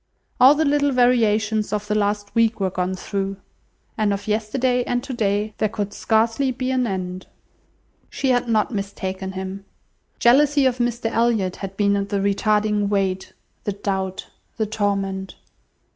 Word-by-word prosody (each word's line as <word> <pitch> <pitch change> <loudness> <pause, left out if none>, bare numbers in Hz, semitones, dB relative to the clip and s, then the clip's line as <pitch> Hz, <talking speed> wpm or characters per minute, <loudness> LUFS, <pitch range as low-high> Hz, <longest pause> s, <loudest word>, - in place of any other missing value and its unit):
All 260 +4 +8
the 315 +1 +1
little 285 0 +2
variations 220 -4 +2
of 210 -1 -2
the 210 - 0
last 205 -1 -1
week 230 -1 +2
were 190 -1 0
gone 185 +1 -2
through; 195 +1 -3 0.6
and 210 -1 +2
of 200 +1 -3
yesterday 245 +4 0
and 245 0 -1
today 215 -5 -1
there 215 - +2
could 205 -1 -4
scarcely 230 +4 +1
be 255 +1 -2
an 255 -2 +1
end. 185 -2 -4 0.8
She 270 - -1
had 245 -1 +1
not 220 +1 +1
mistaken 190 -1 -4
him. 190 +1 -6 0.5
Jealousy 280 +3 +4
of 250 -1 +1
Mr 240 0 -1
Elliot 225 -6 +1
had 195 -1 -7
been 200 -1 +3
the 205 - -1
retarding 210 +1 +1
weight, 190 -2 -1 0.3
the 205 - -2
doubt, 190 -1 -3 0.3
the 220 - +1
torment. 195 -2 -2
210 Hz, 150 wpm, -22 LUFS, 195-240 Hz, 0.8 s, All